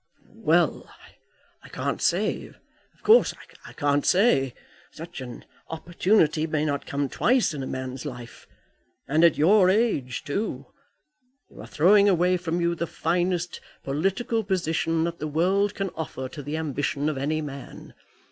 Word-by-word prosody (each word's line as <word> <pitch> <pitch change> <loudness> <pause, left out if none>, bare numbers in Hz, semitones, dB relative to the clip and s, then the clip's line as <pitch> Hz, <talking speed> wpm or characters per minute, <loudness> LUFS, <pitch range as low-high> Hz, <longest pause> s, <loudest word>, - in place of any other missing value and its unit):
"Well; - - +2 0.7
I - - -15
can't - - -3
say. - - 0
Of - - -26
course, 455 +3 +5 0.3
I - - -11
can't 145 0 +1
say. 175 - +3 0.3
Such 165 -3 -9
an 125 -2 -9 0.2
opportunity 165 -1 +1
may 155 -1 -1
not 145 -2 -2
come 140 0 -1
twice 245 - +2
in 145 - -5
a 130 - -4
man's 130 0 -5
life. 120 -5 -9 0.6
And 155 +4 +2
at 170 -3 +5
your 185 +4 +5
age 190 - 0
too! 145 - -3 0.9
You - - -12
are - - -10
throwing 200 +6 +5
away 180 0 +3
from 175 -1 -2
you 170 0 +1
the 170 0 -3
finest 175 +2 -1 0.2
political 195 - -1
position 165 -4 0
that 170 0 -3
the 155 - -3
world 190 +7 +1
can 195 -2 -3
offer 130 -5 -5
to 150 - -8
the 145 +3 -4
ambition 145 -1 -2
of 150 -3 -1
any 155 +3 -1
man. 140 -2 -9
160 Hz, 150 wpm, -25 LUFS, 145-185 Hz, 0.9 s, course